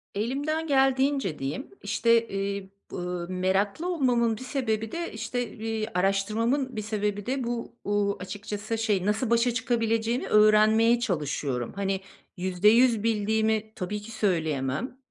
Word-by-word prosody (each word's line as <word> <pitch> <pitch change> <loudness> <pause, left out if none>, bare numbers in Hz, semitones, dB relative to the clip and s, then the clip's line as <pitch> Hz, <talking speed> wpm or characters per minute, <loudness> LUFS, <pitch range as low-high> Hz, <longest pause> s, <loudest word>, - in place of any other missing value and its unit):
Elimden 285 +9 -1
geldiğince 270 - +2
diyeyim. 140 - -4 0.2
İşte, 230 +2 +2
iii, 195 0 -3 0.2
bı 180 -1 -4
meraklı 195 - 0
olmamın 240 -7 +2
bir - - -11
sebebi 225 -5 -2
de, 340 0 -4
işte, 225 +1 -3
iii, 220 0 -3
araştırmamın 220 +8 0
bir 215 - -2
sebebi 210 -1 -2
de 260 +1 -1
bu, 235 0 -4
uuu, 205 0 0
açıkçası, 205 +3 -5
şey, 210 -4 0
nasıl 215 +3 0
başa 235 +1 +3
çıkabileceğini 230 0 0
öğrenmeye 215 +2 +5
çalışıyorum. 145 - -2
Hani, 195 -1 -1 0.4
%100 210 +6 +4
bildiğimi 220 0 +1
tabii 205 +3 -4
ki 220 +2 -10
söyleyemem. 165 - -1
220 Hz, 125 wpm, -27 LUFS, 195-235 Hz, 0.4 s, öğrenmeye